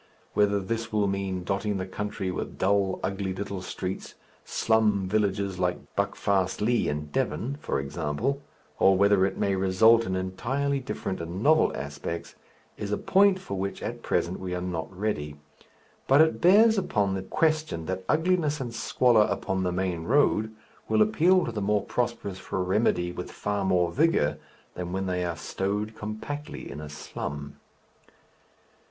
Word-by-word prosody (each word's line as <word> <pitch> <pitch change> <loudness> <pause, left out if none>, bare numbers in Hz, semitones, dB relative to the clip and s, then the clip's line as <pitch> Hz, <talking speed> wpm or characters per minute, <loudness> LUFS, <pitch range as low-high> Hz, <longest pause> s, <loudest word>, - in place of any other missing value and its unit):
Whether 100 -1 +3
this 115 +3 -3
will 105 -1 +2
mean 95 -2 -2
dotting 100 +2 -1
the 95 - -3
country 95 -1 -4
with - - -5
dull, 95 -1 +1
ugly 95 -1 -2
little 100 -1 -4
streets, 95 +1 -5 0.3
slum 105 -4 +2
villages 100 -2 0
like 90 -1 -2
Buckfastleigh 100 +4 +1
in 75 0 -3
Devon, 135 - -1
for - - -1
example, 75 - -2 0.4
or 95 -1 +5
whether 100 -1 +4
it - - -6
may 100 - +1
result 105 +5 +5
in 95 - -1
entirely 130 +10 -1
different 100 -8 -4
and 85 +5 -5
novel 155 +2 +5
aspects, 70 +4 -5 0.4
is 105 -1 -4
a 105 - +1
point 195 0 +4
for 100 - -5
which 100 +1 -3
at - - -4
present 90 +2 -1
we 90 -1 -4
are - - -2
not 90 -2 -4
ready. 90 -7 -3 0.7
But 135 +3 +6
it 160 0 +2
bears 210 +4 +6
upon 105 - 0
the 95 - -2
question 155 - 0
that 95 +2 -3
ugliness 160 -2 +2
and 120 -3 -4
squalor 115 -1 +3
upon 95 0 -1
the 90 -1 0
main 90 -2 -2
road 110 -4 +3 0.4
will 110 0 +5
appeal 170 - +3
to - - -3
the 110 -2 -3
more 105 0 +1
prosperous 120 -6 -2
for 95 - -3
remedy 90 -2 +1
with 90 - -6
far 100 -1 -2
more 90 -3 +2
vigour 145 - +2 0.3
than 90 0 -5
when 95 0 -1
they 90 -1 -1
are 85 -2 -2
stowed 105 +3 -2
compactly 110 +8 -6
in 75 - -7
a 75 - -7
slum. 75 -1 -6
100 Hz, 160 wpm, -27 LUFS, 90-115 Hz, 0.7 s, But